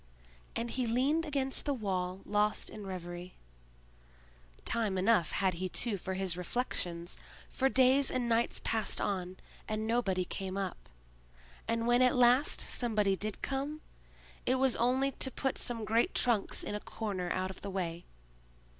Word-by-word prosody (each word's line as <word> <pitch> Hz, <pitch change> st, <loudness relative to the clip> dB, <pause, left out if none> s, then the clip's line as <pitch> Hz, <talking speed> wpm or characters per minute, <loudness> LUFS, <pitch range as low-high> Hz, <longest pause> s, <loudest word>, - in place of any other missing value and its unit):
And 230 Hz, 0 st, -2 dB
he 255 Hz, -2 st, 0 dB
leaned 275 Hz, +8 st, +2 dB
against 270 Hz, -2 st, -1 dB
the 285 Hz, -, +1 dB
wall 190 Hz, -4 st, -2 dB
lost 210 Hz, +1 st, +1 dB
in 210 Hz, -2 st, -8 dB
reverie. 175 Hz, -1 st, -7 dB, 1.3 s
Time 215 Hz, -5 st, +1 dB
enough 190 Hz, -3 st, +3 dB
had 190 Hz, -2 st, +1 dB
he 185 Hz, +2 st, -3 dB
too 225 Hz, +3 st, 0 dB
for 190 Hz, 0 st, -4 dB
his 190 Hz, -3 st, 0 dB
reflections; 175 Hz, -3 st, -1 dB, 0.3 s
for 265 Hz, 0 st, +2 dB
days 265 Hz, +1 st, +4 dB
and 250 Hz, -2 st, -1 dB
nights 230 Hz, 0 st, +1 dB
passed 220 Hz, -2 st, 0 dB
on, 185 Hz, -2 st, -2 dB, 0.3 s
and 215 Hz, 0 st, -2 dB
nobody 205 Hz, -6 st, +1 dB
came 190 Hz, +1 st, -4 dB
up; 195 Hz, -2 st, -4 dB, 0.8 s
and 230 Hz, 0 st, 0 dB
when 240 Hz, +1 st, +4 dB
at 250 Hz, -1 st, +4 dB
last 250 Hz, +4 st, +4 dB
somebody 210 Hz, -5 st, +1 dB
did 210 Hz, +2 st, -4 dB
come, 280 Hz, +3 st, -2 dB, 0.6 s
it 255 Hz, -, +2 dB
was 260 Hz, -1 st, +3 dB
only 260 Hz, +3 st, +2 dB
to 265 Hz, -, +2 dB
put 270 Hz, 0 st, -2 dB
some 230 Hz, -3 st, -1 dB
great 230 Hz, -, +2 dB
trunks 230 Hz, -5 st, +3 dB
in -, -, -4 dB
a 210 Hz, -, -2 dB
corner 200 Hz, -5 st, -4 dB
out 185 Hz, 0 st, -1 dB
of 190 Hz, -, -12 dB
the 200 Hz, -, -5 dB
way. 175 Hz, -3 st, -3 dB
215 Hz, 155 wpm, -32 LUFS, 190-250 Hz, 1.3 s, days